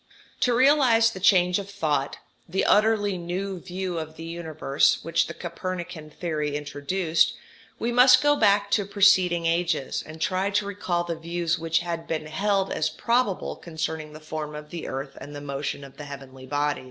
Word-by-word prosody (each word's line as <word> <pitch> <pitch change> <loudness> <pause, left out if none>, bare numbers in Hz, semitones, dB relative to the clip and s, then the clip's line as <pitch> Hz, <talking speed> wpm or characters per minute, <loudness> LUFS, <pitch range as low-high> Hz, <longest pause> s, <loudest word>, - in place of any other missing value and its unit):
To 245 -1 +2
realize 250 -4 +5
the 190 - -8
change 180 -1 +4
of 200 0 -7
thought, 150 -8 -1 0.3
the 190 +3 0
utterly 205 -3 +3
new 185 +2 -4
view 180 -1 -4
of 160 0 -7
the 165 - -9
universe, 160 -4 +1
which 165 +1 +1
the - - -6
Copernican 175 -2 -6
theory 150 -2 -3
introduced, 155 +4 0 0.4
we 235 - -1
must 250 +2 +7
go 290 0 +5
back 200 -4 +3
to 205 -1 +2
preceding 185 -4 +4
ages, 165 -4 0
and 155 +1 -11
try 185 +4 0
to 205 0 0
recall 185 -4 -2
the 170 -1 -3
views 170 0 -2
which 165 0 +1
had 170 -1 -4
been 155 -1 -2
held 195 +5 0
as - - 0
probable 235 -5 0
concerning 160 -2 -5
the 155 - -9
form 155 -1 -6
of 150 0 -9
the 170 - -5
earth 135 +1 -5
and 145 +2 -9
the - - -5
motion 140 0 -4
of 135 0 -13
the 150 - -7
heavenly 135 -2 -10
bodies. 145 +1 0
170 Hz, 175 wpm, -25 LUFS, 155-195 Hz, 0.4 s, must